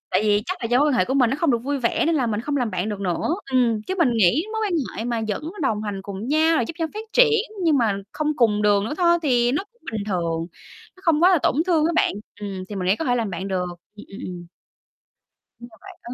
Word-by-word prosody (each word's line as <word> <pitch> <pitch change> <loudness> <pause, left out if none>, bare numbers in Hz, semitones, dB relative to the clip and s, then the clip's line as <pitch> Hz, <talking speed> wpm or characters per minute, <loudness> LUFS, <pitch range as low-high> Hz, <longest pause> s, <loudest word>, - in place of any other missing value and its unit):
tại - - +2
vì 210 -1 +2
chắc 370 - -2
là - - -5
do 245 +2 +2
mối 290 - +4
quan 285 - +2
hệ 245 - +3
của 265 - -2
mình 250 -4 +3
nó 270 - 0
không 335 - +3
được 235 - +2
vui 280 +4 -2
vẻ, 235 -3 +1
nên 330 - +2
là 260 -5 +1
mình 215 -1 -1
không 285 +3 -2
làm 245 -4 0
bạn 185 +2 -2
được 205 -2 -4
nữa. 190 - -1 0.2
Ừm, 235 -4 +2
chứ 375 - -4
mình 280 -8 +3
nghĩ 225 - +3
mối 440 - -2
quan 390 - -2 0.2
hệ 225 - -3
mà 235 -1 -1
vẫn 295 +10 -3
đồng 215 -6 0
hành 200 -2 -4
cùng 200 +3 -6
nhau, 315 +3 +3
rồi 240 - +2
giúp 330 - -7
nhau 325 -1 -1
phát 435 +1 -5
triển 450 -3 +5 0.2
nhưng 310 -4 +4
mà 215 -5 +1
không 305 -1 -1
cùng 210 -4 +2
đường 205 -1 +3
nữa 285 - -3
thôi, 345 -1 +4
thì 245 -4 +2
nó 300 - -1
cũng 475 - -36
bình 215 -2 -3
thường. 170 -4 -1 0.5
Nó - - -18
không 330 -2 +3
quá 365 - +7
là 365 - +4
tổn - - +2
thương 325 -4 +3
á 340 - 0
bạn, - - +2 0.3
ừm, 195 -2 -5
thì 210 - -6
mình 185 -1 -3
nghĩ 195 - +3
có 325 - -3
thể 245 - +1
làm 225 -4 -1
bạn 185 +2 -5
được. 185 -2 -1 0.3
Ừm, 210 - -11
ừm, 195 - -10
ừm. 175 -1 -7 1.1
Nhưng 240 - -11
mà 220 - -18
bạn - - -12
có 240 - -7
240 Hz, 285 wpm, -23 LUFS, 205-305 Hz, 1.1 s, quá